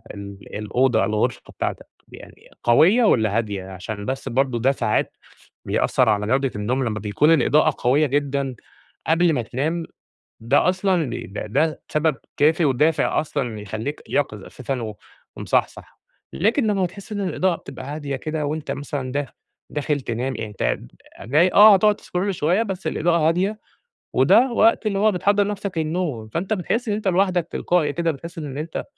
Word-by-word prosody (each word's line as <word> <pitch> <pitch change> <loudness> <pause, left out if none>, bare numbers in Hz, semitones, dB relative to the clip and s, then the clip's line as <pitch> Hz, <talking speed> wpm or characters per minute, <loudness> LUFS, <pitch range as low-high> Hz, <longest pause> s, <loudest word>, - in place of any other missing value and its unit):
ال 100 0 -10
الأوضة 115 +2 +1
الغرفة 110 +2 -1 0.2
بتاعتك - - -3 0.2
يعني - - -14
قوية 175 - +5
والّا 110 - +3
هادية؟ 105 -4 -2
عشان 100 +3 -6
بس 135 +1 -3
برضو 130 0 +1
ده 125 +4 +3
ساعات 115 -5 -1 0.5
بيأثر 125 - +1
على 105 -1 +1
جودة 135 +3 +1
النوم 125 +6 -1
لمّا 110 -2 -2
بيكون 105 +10 +2
الإضاءة 155 0 +3
قوية 140 +5 +3
جدًا 140 -1 -1 0.5
قبل 165 +1 +3
ما 130 -5 0
تنام، 155 +9 -2 0.6
ده 120 +10 +3
أصلًا 185 -6 +1 0.2
ده 105 +2 -6
ده 150 +9 0
سبب 155 -1 +1 0.2
كافي 155 +3 +3
ودافع 150 +3 +2
أصلًا 125 -8 -3
يخلّيك 110 +8 -5
يقِظ 105 -8 -1
أساسًا 130 0 -5
و 110 -2 -6 0.4
ومصحصح، - - -2 0.3
لكن 225 - +1
لمّا 205 -3 +1
بتحس 195 +4 -7
إن 205 - -3
الإضاءة 185 -1 0
بتبقى - - -10
هادية 145 -1 -4
كده 155 +2 -3
وأنت 150 -1 -4
مثلًا 140 -2 -4
داخ 145 -1 -2 0.4
داخل 150 0 -1
تنام 125 +1 -3
يعني 110 - -5
أنت 105 - -1 0.5
جاي 155 - +3
آه 210 0 +9
هتقعد 210 +2 +3
تscroll 185 +3 -2
شوية 180 +4 +1
بس 190 -5 -5
الإضاءة 165 0 +2
هادية، 190 +6 0 0.5
وده 255 +2 +5
وقت 225 -1 +3
اللي 200 -2 0
هو 215 +1 +3
بتحضر 200 +2 +2
نَفسك 200 -3 -4
للنوم، 155 -8 -2
فأنت 175 - -3
بتحس 225 +5 -2
إن 210 - +1
أنت 210 -1 -2
لوحدك 180 -2 +1
تلقائي 165 -5 +1
كده 170 +1 0
بتحس 165 +3 -8
إن 145 -3 -5
أنت 155 +2 -4
150 Hz, 160 wpm, -22 LUFS, 125-180 Hz, 0.6 s, آه